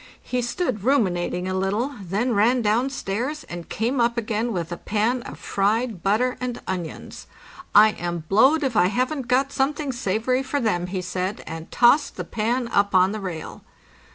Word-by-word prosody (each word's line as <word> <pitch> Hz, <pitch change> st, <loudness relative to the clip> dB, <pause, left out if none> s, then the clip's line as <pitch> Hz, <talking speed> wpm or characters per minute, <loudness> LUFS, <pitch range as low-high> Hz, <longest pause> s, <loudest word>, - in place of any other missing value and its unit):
He 250 Hz, 0 st, -1 dB
stood 240 Hz, -, -2 dB
ruminating 185 Hz, -8 st, +1 dB
a 185 Hz, -, -2 dB
little, 200 Hz, +9 st, -1 dB
then 205 Hz, +7 st, -1 dB
ran 235 Hz, +4 st, +3 dB
down 225 Hz, +5 st, +2 dB
stairs, 265 Hz, +5 st, -3 dB
and 175 Hz, -1 st, -8 dB
came 240 Hz, +4 st, 0 dB
up 235 Hz, 0 st, +1 dB
again 225 Hz, +1 st, -1 dB
with 175 Hz, -4 st, -3 dB
a 175 Hz, -, -3 dB
pan 220 Hz, +7 st, 0 dB
of -, -, -9 dB
fried 215 Hz, 0 st, 0 dB
butter 220 Hz, +7 st, +1 dB
and 250 Hz, -1 st, -3 dB
onions. 180 Hz, -4 st, -6 dB, 0.3 s
'' -, -, -17 dB
Iam 175 Hz, -6 st, +4 dB
blowed 265 Hz, -, +4 dB
if 260 Hz, -4 st, -1 dB
I 180 Hz, -2 st, +5 dB
haven't 255 Hz, +5 st, -1 dB
got 265 Hz, +3 st, +2 dB
something 285 Hz, +1 st, -1 dB
savory 240 Hz, +2 st, 0 dB
for 275 Hz, +2 st, -2 dB
them," 180 Hz, -8 st, 0 dB
he 185 Hz, 0 st, -3 dB
said, 185 Hz, +3 st, -3 dB
and 160 Hz, 0 st, -7 dB
tossed 265 Hz, +5 st, +4 dB
the -, -, -4 dB
pan 235 Hz, +3 st, -1 dB
up 200 Hz, -2 st, +2 dB
on 185 Hz, +1 st, +5 dB
the 215 Hz, -, -4 dB
rail. 180 Hz, -5 st, -6 dB
220 Hz, 180 wpm, -23 LUFS, 190-255 Hz, 0.3 s, I